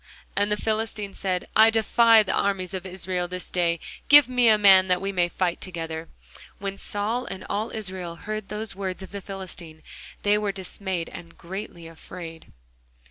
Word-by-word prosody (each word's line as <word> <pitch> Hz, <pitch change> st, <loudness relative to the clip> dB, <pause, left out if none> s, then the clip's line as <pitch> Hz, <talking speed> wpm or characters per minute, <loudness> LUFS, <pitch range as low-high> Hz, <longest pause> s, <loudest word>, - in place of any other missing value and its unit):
And 205 Hz, +1 st, +1 dB
the 210 Hz, -, +2 dB
Philistine 215 Hz, -2 st, -2 dB
said, 185 Hz, -2 st, -2 dB
I 220 Hz, +1 st, +8 dB
defy 225 Hz, 0 st, +5 dB
the 190 Hz, -, -2 dB
armies 195 Hz, -2 st, 0 dB
of 190 Hz, 0 st, -4 dB
Israel 180 Hz, -1 st, -2 dB
this 180 Hz, 0 st, -6 dB
day; 170 Hz, -2 st, +1 dB, 0.3 s
give 290 Hz, -1 st, +9 dB
me 250 Hz, -1 st, +3 dB
a 215 Hz, -1 st, +7 dB
man, 190 Hz, -2 st, +7 dB
that 180 Hz, -1 st, +2 dB
we 195 Hz, +1 st, -2 dB
may 175 Hz, -2 st, +1 dB
fight 175 Hz, -1 st, -1 dB
together. 165 Hz, -2 st, -5 dB, 0.5 s
When 195 Hz, 0 st, -4 dB
Saul 215 Hz, +5 st, -2 dB
and 190 Hz, -5 st, -7 dB
all 215 Hz, +3 st, -2 dB
Israel 185 Hz, -5 st, -5 dB
heard 215 Hz, +3 st, -5 dB
those 210 Hz, +1 st, -5 dB
words 190 Hz, -1 st, -4 dB
of -, -, -10 dB
the 200 Hz, 0 st, -6 dB
Philistine, 185 Hz, -5 st, -9 dB, 0.4 s
they 210 Hz, +1 st, +4 dB
were 210 Hz, -1 st, -1 dB
dismayed, 190 Hz, -2 st, -4 dB
and 170 Hz, -1 st, -11 dB
greatly 180 Hz, -1 st, -7 dB
afraid. 165 Hz, 0 st, -10 dB
195 Hz, 175 wpm, -25 LUFS, 180-210 Hz, 0.5 s, give